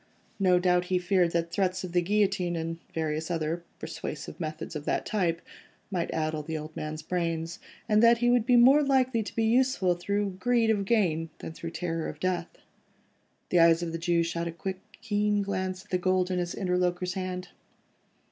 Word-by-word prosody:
No 185 Hz, -2 st, +4 dB
doubt 180 Hz, 0 st, +2 dB
he 185 Hz, 0 st, +1 dB
feared 180 Hz, -1 st, +2 dB
that 170 Hz, 0 st, 0 dB
threats 185 Hz, -1 st, 0 dB
of 180 Hz, -, -5 dB
the 175 Hz, 0 st, +3 dB
guillotine, 195 Hz, -2 st, +1 dB
and 165 Hz, 0 st, -3 dB
various 160 Hz, 0 st, -2 dB
other 165 Hz, 0 st, -1 dB, 0.2 s
persuasive 155 Hz, 0 st, -6 dB
methods 160 Hz, 0 st, -5 dB
of 150 Hz, -1 st, -5 dB
that -, -, 0 dB
type, 175 Hz, -6 st, 0 dB, 0.5 s
might 175 Hz, -3 st, -1 dB
addle 155 Hz, -1 st, -1 dB
the 160 Hz, +1 st, -4 dB
old 155 Hz, +1 st, -8 dB
man's 155 Hz, 0 st, -5 dB
brains, 165 Hz, -1 st, -2 dB, 0.3 s
and 215 Hz, -1 st, +4 dB
that 235 Hz, 0 st, +6 dB
he 240 Hz, +1 st, +1 dB
would 245 Hz, -2 st, +4 dB
be 250 Hz, +2 st, +3 dB
more 260 Hz, +5 st, +7 dB
likely 260 Hz, -4 st, +2 dB
to 215 Hz, -, -7 dB
be 225 Hz, -, +1 dB
useful 230 Hz, -5 st, +3 dB
through 200 Hz, +2 st, -2 dB
greed 235 Hz, -2 st, +3 dB
of 200 Hz, -2 st, 0 dB
gain, 175 Hz, -7 st, +1 dB
than -, -, -7 dB
through 165 Hz, +1 st, -6 dB
terror 165 Hz, -1 st, -3 dB
of -, -, -9 dB
death. 180 Hz, -2 st, -1 dB, 1.0 s
The 180 Hz, -, +3 dB
eyes 165 Hz, 0 st, +5 dB
of 170 Hz, -, -3 dB
the 165 Hz, -, -4 dB
Jew 170 Hz, 0 st, +2 dB
shot 170 Hz, 0 st, -2 dB
a -, -, -3 dB
quick, 185 Hz, +3 st, -5 dB, 0.2 s
keen 210 Hz, -1 st, +1 dB
glance 190 Hz, -1 st, -3 dB
at -, -, -26 dB
the 180 Hz, -, +1 dB
gold 185 Hz, 0 st, +1 dB
in 180 Hz, -, 0 dB
his 175 Hz, -1 st, -3 dB
interlocutor's 180 Hz, -1 st, 0 dB
hand. 185 Hz, -1 st, -4 dB
180 Hz, 195 wpm, -28 LUFS, 165-200 Hz, 1.0 s, more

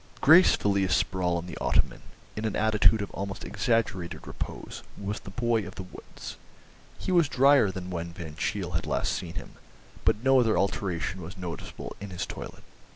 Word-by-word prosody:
Gracefully 105 Hz, -, +6 dB
asprawl 90 Hz, -1 st, +1 dB
on 85 Hz, -, -4 dB
the 90 Hz, -, -7 dB
ottoman, -, -, +1 dB, 0.3 s
in 110 Hz, -, -4 dB
an 110 Hz, -, -1 dB
attitude 110 Hz, 0 st, +4 dB
of -, -, -7 dB
almost 100 Hz, +2 st, -5 dB
exaggerated 110 Hz, -7 st, -1 dB
repose, -, -, -6 dB, 0.2 s
was 100 Hz, +1 st, -3 dB
the -, -, -10 dB
boy 120 Hz, +1 st, +1 dB
of 95 Hz, -, -10 dB
the 95 Hz, -, -5 dB
woods. 90 Hz, -, -10 dB, 0.6 s
He -, -, -3 dB
was 170 Hz, -5 st, +4 dB
drier 135 Hz, -4 st, +5 dB
than 90 Hz, -1 st, -6 dB
when 85 Hz, -1 st, -4 dB
Van 85 Hz, -4 st, -8 dB
Cheele 90 Hz, +1 st, -2 dB
had 85 Hz, -2 st, -2 dB
last -, -, 0 dB
seen 85 Hz, -2 st, -5 dB
him, -, -, -8 dB, 0.5 s
but 110 Hz, +1 st, +2 dB
no 135 Hz, 0 st, +6 dB
other 115 Hz, -3 st, +3 dB
alteration 95 Hz, -2 st, -1 dB
was 90 Hz, +4 st, -8 dB
noticeable 90 Hz, -2 st, -6 dB
in 100 Hz, -, -6 dB
his 90 Hz, -2 st, -3 dB
toilet. -, -, -8 dB
100 Hz, 175 wpm, -28 LUFS, 90-110 Hz, 0.6 s, Gracefully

